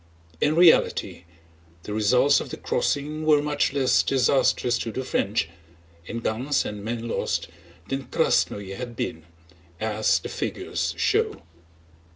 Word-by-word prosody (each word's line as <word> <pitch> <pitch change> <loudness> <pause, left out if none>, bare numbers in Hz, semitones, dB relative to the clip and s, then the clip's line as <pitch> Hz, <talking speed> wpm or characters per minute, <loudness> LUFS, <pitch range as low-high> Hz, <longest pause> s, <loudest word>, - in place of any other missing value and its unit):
In 150 - +2
reality 165 - +4 0.6
the 105 - -6
results 125 +7 +4
of - - -6
the - - -6
crossing 150 +2 -1
were 155 -1 +5
much 145 0 0
less 135 -2 +3
disastrous 125 -2 +2
to 115 - -3
the 130 - -4
French—in 85 -2 -4
guns 125 +7 0
and 105 -1 -6
men 115 +1 -4
lost—than 85 +5 -4
Krásnoe 100 - 0
had 120 0 -7
been, 80 -6 -4 0.5
as 110 0 +1
the - - -6
figures - - -3
show. - - 0
115 Hz, 125 wpm, -25 LUFS, 100-140 Hz, 0.6 s, were